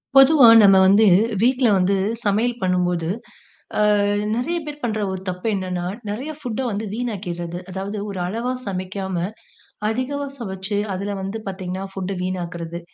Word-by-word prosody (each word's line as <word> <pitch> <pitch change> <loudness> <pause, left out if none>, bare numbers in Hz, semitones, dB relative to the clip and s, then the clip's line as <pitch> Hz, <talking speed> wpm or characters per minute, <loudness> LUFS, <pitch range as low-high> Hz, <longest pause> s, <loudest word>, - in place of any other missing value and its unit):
பொதுவா 270 -2 +8 0.2
நம்ம 195 -1 +7
வந்து 205 +3 +6 0.4
வீட்ல 255 +1 +3
வந்து 190 +2 +2 0.3
சமையல் 230 +4 +1
பண்ணும்போது, 180 -2 0 0.7
அ - - +4 0.5
நெறைய 270 +9 -1
பேர் 295 0 -8
பண்ற 220 -3 -1
ஒரு 190 -1 -5
தப்பு 180 +4 -4
என்னன்னா, 185 -2 -3 0.2
நெறைய 255 +9 -4
ஃபுட்ட 245 -4 -4
வந்து 210 +2 -3
வீணாக்கியர்றது. 175 -7 -4
அதாவது 195 +3 -4
ஒரு 195 -2 -5
அளவா 230 +6 -2
சமைக்காம 190 0 -4 0.7
அதிகமா 260 +5 -2
சமைச்சு, 195 -2 -3 0.2
அதுல 200 +2 -3
வந்து 195 +3 -4
பார்த்தீங்கன்னா, 185 0 -4
ஃபுட்ட 195 0 -3
வீணாக்குறது. 170 -2 -4
195 Hz, 135 wpm, -22 LUFS, 185-235 Hz, 0.7 s, பொதுவா